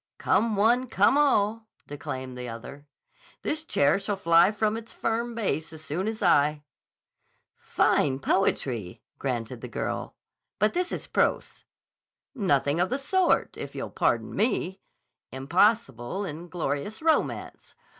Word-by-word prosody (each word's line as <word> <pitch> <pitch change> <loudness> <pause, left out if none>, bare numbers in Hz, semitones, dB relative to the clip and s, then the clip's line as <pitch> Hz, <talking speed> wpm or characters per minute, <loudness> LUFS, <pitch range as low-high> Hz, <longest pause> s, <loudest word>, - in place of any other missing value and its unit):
"Come 225 -1 +2
one, 240 +5 +3
come 205 +2 +3
all," 225 -6 +2 0.2
declaimed 130 -3 -6
the 125 -1 -6
other; 140 +5 -9 0.6
"this 310 +1 -1
chair 145 - +2
shall 200 0 -3
fly 170 0 +5
from 215 0 0
its 225 0 -6
firm 230 +1 -2
base 160 -9 -2
as 155 0 -10
soon 160 +7 -3
as 220 -1 -3
I." 150 -3 +3 0.9
"Fine 135 -2 +1
poetry," 125 - -1 0.2
granted 120 -5 -3
the - - -6
girl. - - -4 0.4
"But 210 +1 +2
this 360 0 -1
is - - -4
prose." - - -1 0.7
"Nothing 145 - +1
of 180 - +2
the 265 - 0
sort, 355 +6 +1
if - - -7
you'll - - -5
pardon - - 0
me. 195 -5 0 0.5
Impossible 170 - +1
and 170 +1 -7
glorious 165 - -3
romance. 320 -1 -1
190 Hz, 135 wpm, -27 LUFS, 140-225 Hz, 0.9 s, fly